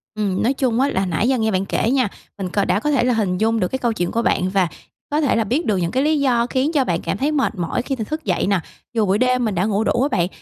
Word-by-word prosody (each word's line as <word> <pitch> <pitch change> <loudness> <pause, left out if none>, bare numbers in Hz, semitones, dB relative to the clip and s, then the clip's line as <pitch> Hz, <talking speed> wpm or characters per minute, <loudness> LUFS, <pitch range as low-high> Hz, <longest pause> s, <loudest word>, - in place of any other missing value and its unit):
Ừm, 200 -3 -1
nói 245 +4 +2
chung 255 -4 0
á, 275 +2 +3
là 190 -5 0
nãy 180 +5 0
giờ 265 - +2
nghe 220 -1 +1
bạn 190 0 0
kể 220 - 0
nha, 260 -4 +2 0.3
mình 190 -2 -4
cò 200 +2 0
đã 185 - +1
có 295 +7 -1
thể 280 - +2
là 250 0 +2
hình 200 -5 0
dung 225 +3 +1
được 180 - +1
cái 265 - -3
câu 240 -2 0
chuyện 175 -5 -2
của 230 - 0
bạn, 185 -5 +1
và 190 -2 +2 0.4
có 300 +1 +1
thể 285 - +2
là 225 - +2
biết 260 - -1
được 210 -3 +1
những 170 -1 -1
cái 265 - +1
lý 305 0 +2
do 245 -4 +2
khiến 265 +4 0
cho 280 -4 +2
bạn 170 -5 -1
cảm - - -2
thấy 280 +7 0
mệt 275 -6 0
mỏi 175 +5 -2
khi 270 +2 -3
th 240 - -6
thức 310 -1 -4
dậy - - 0
nè, 200 -2 +2 0.3
dù 225 -2 +2
buổi 195 +1 +2
đêm 255 +1 +2
mình 210 -3 -1
đã 180 +3 +1
ngủ 210 0 +1
đủ 240 - +1
á 275 - +3
bạn. 175 0 +2
225 Hz, 325 wpm, -20 LUFS, 195-260 Hz, 0.4 s, á